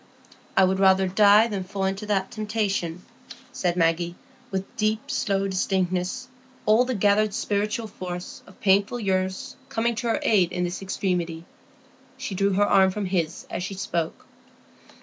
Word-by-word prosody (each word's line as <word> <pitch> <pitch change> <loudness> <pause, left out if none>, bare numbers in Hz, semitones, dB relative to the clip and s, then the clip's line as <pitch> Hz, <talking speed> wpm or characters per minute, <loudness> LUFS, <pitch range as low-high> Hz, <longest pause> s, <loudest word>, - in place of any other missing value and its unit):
"I 190 - +7
would 190 +1 +2
rather 190 0 +5
die 205 +3 +6
than 200 -4 -3
fall 195 +1 -3
into 195 +2 -2
that 195 -2 0
temptation," 205 -6 -2 0.5
said 175 -2 -1
Maggie, 170 +1 +1 0.3
with 190 0 -4
deep, 220 +6 -1
slow 195 -7 0
distinctness, 185 +3 -1 0.4
all 220 +4 +5
the 255 -1 -2
gathered 205 +1 +2
spiritual 210 +2 -1
force 180 -4 -7
of 190 - -17
painful 200 +4 +3
years 190 -2 -1
coming 235 -2 0
to 240 - -2
her 225 - +1
aid 185 -5 +3
in 180 0 -1
this 175 +2 -3
extremity. 175 -4 -2 0.7
She 260 -6 -5
drew 195 +1 +1
her 205 +2 +3
arm 190 -2 +5
from 200 +2 -3
his 180 -2 -2
as - - -3
she 185 +2 -4
spoke. 170 -3 -3
195 Hz, 155 wpm, -25 LUFS, 185-210 Hz, 0.7 s, I